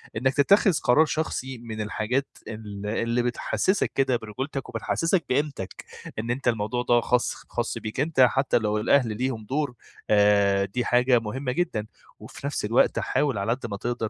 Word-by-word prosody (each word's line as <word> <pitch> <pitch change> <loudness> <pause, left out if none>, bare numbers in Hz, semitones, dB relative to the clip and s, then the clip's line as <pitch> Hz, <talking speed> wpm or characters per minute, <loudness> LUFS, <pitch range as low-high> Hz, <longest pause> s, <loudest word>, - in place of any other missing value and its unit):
إنك 130 +4 +1
تتّخذ 195 +8 +4
قرار 150 +6 +5
شخصي 135 -4 -3
من 115 -2 -6
الحاجات 110 +6 -1 0.2
ال 105 -2 -7
اللي 115 +3 0
بتحسّسك 155 +10 0
كده 135 -2 +2
برجولتك 130 +5 -5
وبتحسّسك 165 - 0
بقيمتك، 135 -7 -2 0.3
إن 115 +2 -2
أنتَ 130 +2 -3
الموضوع 115 +1 0
ده 120 -1 +3
خاص 125 +1 +1 0.2
خاص - - -2
بيك 110 +3 -6
أنتَ 150 0 -1
حتّى 135 +2 +4
لو 105 -2 0
الأهل 115 0 +2
ليهم 125 -3 -2
دور 140 +2 -1 0.4
آآ 100 -1 +4
دي 120 +5 -3
حاجة 125 0 +4
مهمّة 125 +4 -4
جدًا، 130 -8 -1 0.3
وفي 140 - -8
نفْس 140 - -2
الوقت 115 +4 +3
حاول 140 -6 0
على 100 +3 -1
قد 125 +1 -2
ما 100 - -4
تقدر 120 0 -3
120 Hz, 165 wpm, -25 LUFS, 110-135 Hz, 0.4 s, قرار